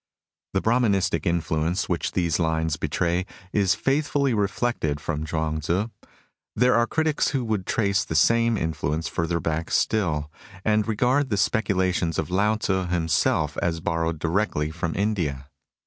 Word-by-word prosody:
The 95 - +1
Brahmanistic 100 - +2
influence 85 +2 0
which 85 -2 -2
these 85 -4 +1
lines 80 -2 0
betray 85 +4 0 0.3
is 100 -1 +3
faithfully 140 +2 +1
reflected 100 -7 -1
from 75 0 -3
Chuang 80 -1 -1
Tzu. 90 +8 -1 0.7
There 125 +3 +4
are 120 0 +3
critics 160 -1 +1
who 135 -4 -1
would 105 -4 -2
trace 100 -3 +1
the 80 - -5
same 115 +8 +4
influence 80 -1 -2
further 85 -1 -1
back 80 0 -2
still, 80 -9 0 0.3
and 105 0 +2
regard 125 +6 +1
the 105 - +1
specu 100 0 +1
lations 90 -3 0
of - - -2
Lao 105 +4 +2
Tzu 95 -4 -1
himself 80 -3 +1
as 85 -1 0
borrowed 80 0 -1
directly 80 -2 0
from 85 0 -3
India. 85 -10 -1
90 Hz, 150 wpm, -24 LUFS, 80-110 Hz, 0.7 s, There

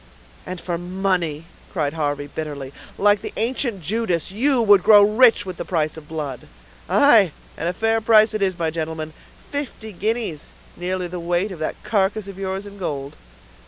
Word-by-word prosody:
"And 185 -1 -5
for 170 -1 -3
money," 175 -4 -1 0.3
cried 150 -5 -1
Harvey, 145 -2 -2
bitterly. 145 -2 -6 0.2
"Like 205 0 +3
the - - -6
ancient 235 -3 -1
Judas, 185 -2 -1
you 255 +6 +4
would 205 -3 +6
grow 205 +1 +7
rich 225 +3 +5
with 185 -2 -6
the - - -4
price 155 -4 -1
of 155 -2 -11
blood!" 150 -5 -5 0.4
"Aye, 225 - +5 0.2
and 165 - -2
a - - -2
fair 225 +3 +1
price 220 0 +5
it 215 - -2
is, 190 -2 +1
my 165 -2 -1
gentleman; 160 -1 -4 0.4
fifty 270 -6 -5
guineas; 210 -5 -3 0.3
nearly 180 +1 -3
the 180 +1 -6
weight 175 +4 0
of 180 - -8
that 155 - -4
carcass 205 0 0
of 195 -1 -9
yours 190 +1 -3
in 200 0 -11
gold." 140 -5 -4
185 Hz, 175 wpm, -22 LUFS, 160-215 Hz, 0.4 s, grow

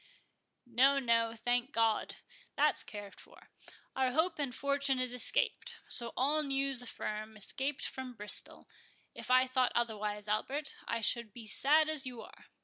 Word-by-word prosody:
"No, 255 +4 +3
no—thank 235 +1 0
God, 225 -1 +1 0.4
that's - - +4
cared 205 -2 -7
for; - - -16 0.4
our 260 -1 +1
Hope 320 +2 +1
and 270 -4 -2
Fortune 280 -1 0
is 255 -1 -2
escaped, 250 - +1
so 235 -1 +2
all 290 +4 +3
news 275 -2 +2
affirm, 215 -2 -6
escaped 270 +6 0
from 260 -2 -6
Bristol—if 210 +3 -8
I 255 0 +5
thought 255 -1 +1
otherwise, 210 -3 -2
Albert, 270 +8 -2
I 230 0 -2
should 235 0 +1
be 240 - -10
as 215 - -3
sad 305 +3 +4
as 305 -4 -1
you 245 -2 -7
are. - - -16
250 Hz, 145 wpm, -32 LUFS, 230-275 Hz, 0.4 s, I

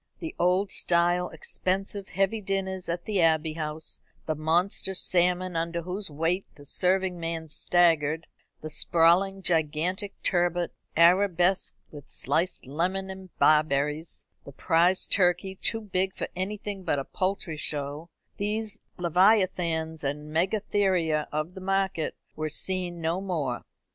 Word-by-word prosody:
The 325 - -6
old 185 +3 +2
style 175 +1 +2
expensive 190 +4 -3
heavy 195 +4 0
dinners 190 -2 -3
at 175 +1 -3
the 205 -4 +1
Abbey 160 -1 +3
House: 155 0 -5 0.3
the 155 - 0
monster 175 +5 0
salmon 180 0 +2
under 170 +1 -1
whose 185 +3 -4
weight 165 +6 -1
the 145 - -13
serving 185 +3 +1
man 165 -1 -4
staggered; 160 -1 +3 0.4
the 155 - -6
sprawling 180 +5 +3
gigantic 170 +4 0
turbot, 175 -1 +2 0.3
arabesqued 180 +1 +4
with 145 -3 -11
sliced 165 +6 -1
lemon 185 +7 -1
and 190 -1 -10
barberries; 150 +1 +2 0.2
the - - -10
prize 170 +6 +2
turkey, 180 0 +2
too 225 +4 -2
big 190 -2 -1
for - - -3
anything 200 +1 -4
but 145 - +1
a 135 - -3
poultry 185 -3 -2
show; 150 +2 -3 0.3
these 210 +1 -2 0.2
leviathans 175 -3 +2
and 150 +2 -3
megatheria 185 -3 +1
of 155 +3 -2
the 190 - -9
market 190 -4 0 0.2
were 155 0 -2
seen 175 +1 -2
no 165 +3 0
more. 155 -10 -2
175 Hz, 130 wpm, -27 LUFS, 160-190 Hz, 0.4 s, arabesqued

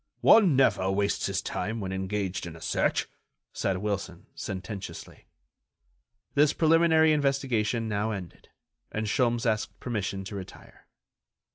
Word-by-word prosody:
"One 195 -10 +6
never 95 -8 +3
wastes 100 +1 0
his - - -2
time 110 +2 -3
when 95 -2 -4
engaged 95 -1 -3
in 85 - -8
a - - -11
search," - - 0 0.5
said 95 - -1
Wilson, 95 -3 -4
sententiously. 95 +1 -7 1.1
This 145 0 +4
preliminary 160 -1 +4
investigation 130 -6 0
now 105 0 -1
ended, 95 -6 -7 0.4
and 110 0 -2
Sholmes 120 +1 +1
asked 110 -2 -1
permission 100 -5 -3
to 100 +2 -7
retire. 95 -2 -11
105 Hz, 125 wpm, -28 LUFS, 95-130 Hz, 1.1 s, One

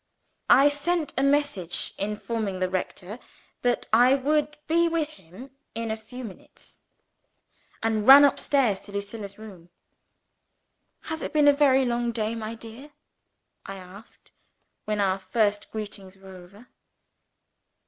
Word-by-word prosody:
I 280 +2 +7
sent 305 +2 -1
a 265 - 0
message, 275 - 0
informing 210 0 -3
the 185 0 -1
rector 190 +3 -5 0.4
that 245 -1 0
I 245 +4 +6
would 300 +2 0
be 335 +2 +2
with 330 -2 -1
him 195 - -14 0.2
in 230 -1 -3
a - - -1
few 245 +4 -10
minutes 200 -6 -13 1.0
and 220 -1 0
ran 280 +2 +10
up 280 - +2
stairs 250 -9 +1
into 205 - -14
Lucilla's 200 0 -6
room. 190 -6 -13 1.3
"Has 320 0 -5
it - - -5
been 300 -1 +4
a 290 - +7
very 270 -2 +3
long 240 -1 -1
day, 220 -1 -2
my 225 0 -5
dear?" 230 +6 -12 0.7
I 195 - -6
asked, 190 +4 -14 0.5
when 210 -1 -2
our 195 -1 +1
first 205 +2 -1
greetings 200 -3 -8
were 190 0 -13
over. 195 +6 -16
225 Hz, 140 wpm, -25 LUFS, 200-275 Hz, 1.3 s, ran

